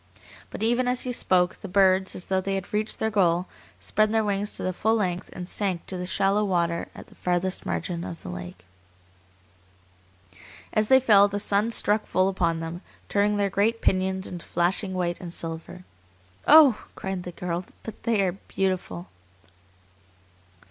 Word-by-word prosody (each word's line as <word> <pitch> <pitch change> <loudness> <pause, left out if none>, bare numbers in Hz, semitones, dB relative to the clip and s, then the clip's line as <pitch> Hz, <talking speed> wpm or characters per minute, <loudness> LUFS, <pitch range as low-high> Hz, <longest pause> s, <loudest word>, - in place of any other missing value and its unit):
But - - -6
even 240 +2 +2
as 250 0 +1
he 255 - -3
spoke, 185 -6 +2
the - - -6
birds, 190 0 +3
as 180 - -7
though 190 -1 0
they 195 +1 -2
had 195 +1 -5
reached 215 +1 -1
their 220 - -1
goal, 180 -3 +2 0.3
spread 215 0 +1
their 220 0 +2
wings 205 0 -1
to - - -4
the 185 - -1
full 220 +5 +1
length 185 -5 -2
and 180 -1 -7
sank 190 -3 -2
to 190 - -3
the 180 0 -4
shallow 195 +3 +2
water 170 -4 0
at - - -10
the - - -19
farthest 180 +1 -1
margin 170 -2 -3
of 170 - -8
the - - -7
lake. 90 0 -8 2.1
As 215 -1 +2
they 265 +2 +7
fell 205 -6 +6
the 205 0 -3
sun 205 +2 +1
struck 215 -1 +1
full 185 +1 +2
upon 170 -4 0
them, 165 +2 -6 0.3
turning 205 +1 +2
their 200 -1 0
great 220 +4 +1
pinions 190 -1 0
into 175 -2 -5
flashing 185 +3 0
white 175 -1 -2
and 175 -2 -7
silver. 165 +2 -5 0.6
"Oh!" 295 -7 +7
cried 190 -1 -4
the 180 - -7
girl, 175 +1 -3 0.2
"but 225 - -9
they 220 -4 +1
are 185 - +1 0.2
beautiful!" 180 - -2
190 Hz, 175 wpm, -25 LUFS, 175-210 Hz, 2.1 s, they